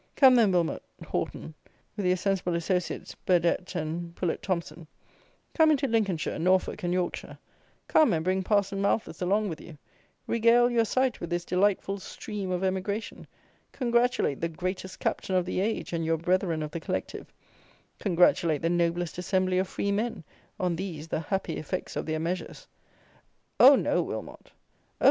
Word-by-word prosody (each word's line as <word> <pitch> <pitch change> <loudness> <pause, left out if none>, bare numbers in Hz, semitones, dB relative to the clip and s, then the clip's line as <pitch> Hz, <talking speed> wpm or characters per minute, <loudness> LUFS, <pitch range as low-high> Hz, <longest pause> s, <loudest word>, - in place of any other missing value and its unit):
Come, 265 -2 +7
then, 230 -5 +5
Wilmot 175 -3 0 0.2
Horton, 155 - -4 0.4
with 200 -3 -1
your 180 - +4
sensible 185 -2 0
associates, 180 +1 -2
Burdett 180 +1 0
and 170 +1 -4
Poulett 175 -3 -2
Thomson; 170 -3 -4 0.7
come 320 -1 +5
into 280 -2 +2
Lincolnshire, 210 -8 0
Norfolk, 185 +3 +1
and 175 - -1
Yorkshire; 180 -1 -2 0.5
come 310 -7 +5
and 160 -3 0
bring 185 +2 +1
Parson 200 0 +1
Malthus 200 0 -1
along 205 +4 +1
with 160 - -6
you; 160 -3 -12 0.5
regale 235 +1 +4
your 230 -1 +3
sight 255 +2 0
with 170 - -5
this 175 0 -2
delightful 195 +1 +1
"stream 205 0 -6
of 180 0 -1
emigration"; 190 +3 -3 0.5
congratulate 240 - +1
the 170 - 0
"greatest 185 +3 -5
captain 190 - -1
of 180 -1 +2
the 185 - -2
age," 210 -2 -2
and 165 -1 -1
your 165 0 +1
brethren 170 -1 0
of 150 - -5
the 170 - -4
Collective: - - -5 0.7
congratulate 170 -5 +3
the 165 - +2
"noblest 175 0 0
assembly 185 0 +1
of 190 - 0
free 200 +2 -2
men," 215 -2 -2 0.4
on 180 -2 0
these 165 -4 -6
the - - -1
happy 190 +4 -2
effects 180 +4 -4
of - - -3
their 155 0 -1
measures. 170 +2 -4 0.9
Oh! - - +10
no, - - +1
Wilmot! - - -6
Oh! - - -32
185 Hz, 160 wpm, -28 LUFS, 170-200 Hz, 0.9 s, Oh